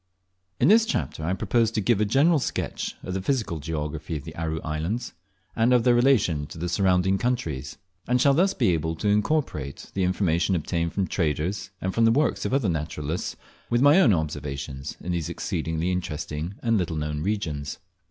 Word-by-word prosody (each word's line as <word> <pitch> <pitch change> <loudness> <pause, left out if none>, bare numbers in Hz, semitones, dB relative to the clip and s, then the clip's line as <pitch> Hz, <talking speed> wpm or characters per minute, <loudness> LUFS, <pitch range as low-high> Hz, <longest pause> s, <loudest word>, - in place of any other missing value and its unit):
IN - - +4
this 220 +2 +6
chapter 150 - -2
I 85 +4 0
propose 115 +3 +2
to 110 - -2
give 105 0 +2
a - - +3
general 145 +9 +4
sketch - - -3
of 90 - -4
the 95 - -2
physical 110 - -1
geography 75 +1 -4
of 70 - -8
the - - -9
Aru 80 -1 -2
Islands, 80 +10 -3 0.4
and 115 +2 +3
of 125 -2 +4
their 125 - +5
relation 115 - +3
to - - -10
the 85 +2 -3
surrounding 95 +1 +2
countries; 80 - -2 0.3
and 125 +1 +2
shall 140 +2 +5
thus 190 +6 +3
be - - +2
able 80 0 -1
to 105 - -3
incorporate 105 - -1
the 95 - 0
information 90 0 +1
obtained 85 0 -1
from 100 - 0
traders, 90 +3 -1
and 95 0 -2
from 115 - +3
the 115 - +5
works 145 +6 +1
of - - -1
other 135 -6 +1
naturalists 75 -1 -3 0.3
with 120 +2 +2
my 145 +6 +7
own 125 - +5
observations 75 -4 -3
in 90 - -4
these 85 -2 -2
exceedingly 80 0 -2
interesting 85 0 -4
and 115 -3 +2
little 85 -2 -2
known 75 0 -2
regions. 80 -7 -2
90 Hz, 190 wpm, -25 LUFS, 80-115 Hz, 0.4 s, my